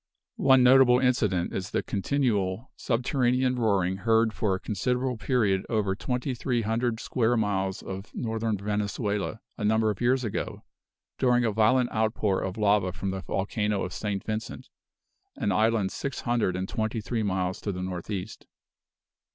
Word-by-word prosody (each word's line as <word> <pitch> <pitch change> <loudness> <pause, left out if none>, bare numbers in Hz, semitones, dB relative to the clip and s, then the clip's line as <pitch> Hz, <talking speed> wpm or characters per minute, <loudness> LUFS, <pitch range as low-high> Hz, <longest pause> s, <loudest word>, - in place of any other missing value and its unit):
One 130 -2 +6
notable 125 -1 +7
incident 110 -9 +1
is 95 0 -3
the - - -1
continual 105 -2 -1
subterranean 125 +1 +1
roaring 95 -5 +1
heard 110 +2 +2
for 100 -4 0
a - - -5
considerable 125 +6 -1
period 105 -4 +1
over 105 -4 0
twenty 125 +5 -2
three 120 -1 -1
hundred 115 +1 0
square 120 -1 +1
miles 95 -3 -1
of 95 +2 -7
Northern 110 -2 -1
Venezuela, 105 +1 -2 0.2
a - - -3
number 110 +1 +3
of 105 - -7
years 125 +2 +2
ago, 110 - -4 0.6
during 125 -1 +3
a 110 - +2
violent 115 +4 +3
outpour 110 -3 0
of 95 +1 -4
lava 100 -3 +2
from 95 +1 -4
the 95 0 -4
volcano 105 +1 -1
of 90 - -5
St. 105 -2 -3
Vincent, 110 0 -5 0.7
an 100 - -1
island 110 0 +2
six 140 -1 -4
hundred 120 -7 0
and 95 +1 -3
twenty 110 +2 -2
three 115 +1 -2
miles 95 -3 -1
to 100 - -2
the 90 -1 -4
northeast. 95 +3 -5
110 Hz, 155 wpm, -27 LUFS, 95-120 Hz, 0.7 s, notable